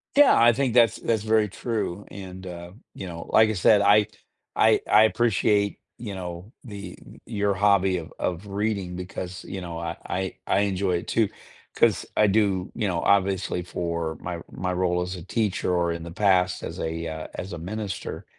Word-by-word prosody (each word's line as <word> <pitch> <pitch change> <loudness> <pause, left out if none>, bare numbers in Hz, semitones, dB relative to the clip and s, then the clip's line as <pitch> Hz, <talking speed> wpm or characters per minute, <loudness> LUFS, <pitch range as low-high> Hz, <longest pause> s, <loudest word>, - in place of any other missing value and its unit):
Yeah. 290 - +7
I 120 +1 +6
think 130 -1 0
that's 115 -2 +5
that's 110 -3 -1
very 110 -1 +2
true. 105 -2 -3
And, 95 -1 -9
uh, 85 -1 -8 0.2
you 95 - -7
know, 85 -1 -7
like 110 0 +6
I - - 0
said, 100 +2 +4
I 105 0 +5 0.5
I - - +5
I 110 - +7
appreciate, 105 -2 +2 0.2
you 105 -4 -6
know, 90 +2 -7
the 100 -6 -8 0.3
your 100 -3 0
hobby 95 -2 +3
of 85 -1 -8
of 90 +2 -2
reading 100 -2 -2
because, 90 0 -6
you 95 - -5
know, 85 -2 -6
I 85 0 -4
I 95 0 -3
I - - +2
enjoy 95 -2 0
it, - - -7
too. 110 -3 +2 0.5
'Cause - - +3
I 105 - +4
do, 100 -3 +1
you 110 -3 -1
know, 85 -3 -1
obviously 95 -2 +1
for 85 -2 -3
my 85 -2 -5
my 90 +1 -3
role 90 -1 0
as 90 +1 -3
a 90 - -8
teacher 105 -3 -1
or 85 -1 +1
in 85 -1 -5
the 85 - -8
past 90 -1 +2
as - - -6
a, 80 +1 -3
uh 80 -1 -5
as 95 - -6
a 85 - -5
minister 100 +3 -5
95 Hz, 190 wpm, -25 LUFS, 90-105 Hz, 0.5 s, Yeah